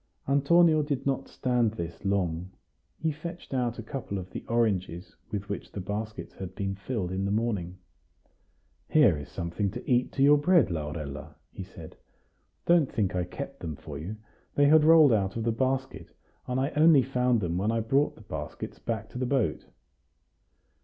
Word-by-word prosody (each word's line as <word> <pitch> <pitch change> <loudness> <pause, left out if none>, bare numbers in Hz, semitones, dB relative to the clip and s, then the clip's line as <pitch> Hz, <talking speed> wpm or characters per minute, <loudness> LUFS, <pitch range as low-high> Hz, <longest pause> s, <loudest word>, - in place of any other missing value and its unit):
Antonio 155 +3 +4
did 145 -3 -2
not 135 -1 -1
stand 120 -4 0
this 85 -4 -6
long; 90 -3 -1 0.5
he 160 - 0
fetched 170 +1 -8
out 120 -2 0
a 115 - -6
couple 115 -4 -5
of 90 -1 -7
the - - -6
oranges 100 -5 -1
with 100 -2 -4
which 100 - -5
the - - -6
baskets 105 +3 -5
had 95 -1 -8
been 100 -2 -2
filled 100 -2 -3
in 95 +1 -2
the 100 - -1
morning. 100 -5 -1 1.1
"Here 140 - +5
is 75 -1 -8
something 85 +4 -2
to 95 - -8
eat 125 0 +2
to 135 - +1
your 145 +1 +6
bread, 170 - +4
Laurella," 75 -3 -5 0.2
he - - -8
said. 90 -4 -11 0.7
"Don't 170 -5 +4
think 100 -5 0
I 90 -1 0
kept 140 +8 -7
them 80 -3 -5
for 70 0 -8
you; 90 +7 -5 0.4
they 145 - +5
had 155 +1 +6
rolled 160 -5 +7
out 95 -3 0
of 115 - -2
the 115 - +1
basket, 130 +3 -2 0.4
and 125 +1 -1
I 135 +3 0
only 150 -3 +6
found 125 -1 +1
them 90 -2 -1
when 105 +3 +1
I 115 - 0
brought 135 +6 +1
the - - -15
baskets - - -7
back - - -3
to 125 - -7
the 130 - -1
boat." 120 - 0
115 Hz, 180 wpm, -28 LUFS, 95-135 Hz, 1.1 s, rolled